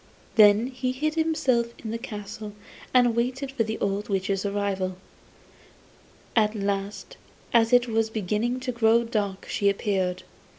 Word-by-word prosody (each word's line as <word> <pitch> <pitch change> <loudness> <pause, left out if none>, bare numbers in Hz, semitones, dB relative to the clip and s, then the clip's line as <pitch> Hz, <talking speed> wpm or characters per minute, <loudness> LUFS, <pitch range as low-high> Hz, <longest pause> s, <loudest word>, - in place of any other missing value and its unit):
Then 210 0 +6
he 255 0 -3
hid 305 +4 -1
himself 305 -7 +1
in 220 - -6
the 230 - -3
castle 210 -1 -7 0.4
and 250 -1 +5
awaited 250 +4 -1
the 220 -3 -1
old 200 +1 -2
witch's 195 0 0
arrival. 195 -2 -2 1.4
At 215 -1 +3
last 200 - -3 0.4
as 230 0 +4
it 245 0 +5
was 225 -1 +1
beginning 220 +4 -1
to 255 0 -2
grow 235 0 +3
dark 205 -4 -2
she 200 - +1
appeared. 190 -2 -1
220 Hz, 135 wpm, -26 LUFS, 200-245 Hz, 1.4 s, Then